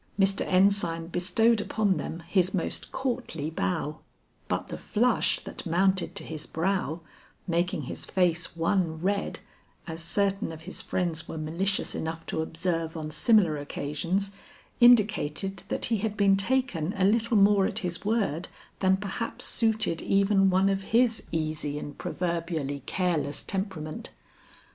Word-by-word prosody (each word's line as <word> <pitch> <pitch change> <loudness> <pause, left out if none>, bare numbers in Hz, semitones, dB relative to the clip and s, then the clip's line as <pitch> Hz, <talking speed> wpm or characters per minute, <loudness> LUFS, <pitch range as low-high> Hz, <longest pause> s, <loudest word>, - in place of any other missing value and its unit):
Mr. 195 0 +3
Ensign 185 -3 +3
bestowed 210 +6 +2
upon 205 -4 +1
them 165 +2 -5
his 180 +2 +1
most 175 - -2
courtly 240 - -3
bow, 160 -2 -2 0.5
but - - -2
the - - -5
flush 235 +2 +1
that - - -8
mounted 185 +2 +2
to - - 0
his 155 -1 -6
brow 175 -1 -1 0.4
making 170 -2 0
his - - -6
face 175 -2 0
one 165 -1 +1
red, 200 +5 -1 0.5
as 165 -1 -6
certain 195 +3 0
of 160 -1 -9
his 185 +3 -5
friends 170 -3 -2
were - - -6
malicious 170 +6 -1
enough 165 +1 -4
to 160 - -2
observe 165 0 -2
on 155 -1 -5
similar 170 0 +3
occasions 165 +7 -2 0.5
indicated 205 -6 +4
that - - -1
he 225 - +1
had 210 +1 -3
been 200 -1 +5
taken 195 - 0
a 190 - +3
little 225 +2 +3
more 200 -1 +5
at - - -5
his 175 -1 -3
word 200 -7 0 0.3
than 190 0 +3
perhaps 205 +3 -3
suited 220 -7 +2
even 195 0 +3
one 190 +1 +3
of 195 0 +1
his 230 +3 +2
easy 155 -2 -2
and 145 0 -7
proverbially 165 -5 -2
careless 165 -6 -1
temperament. 190 -6 -4
185 Hz, 145 wpm, -27 LUFS, 165-200 Hz, 0.5 s, been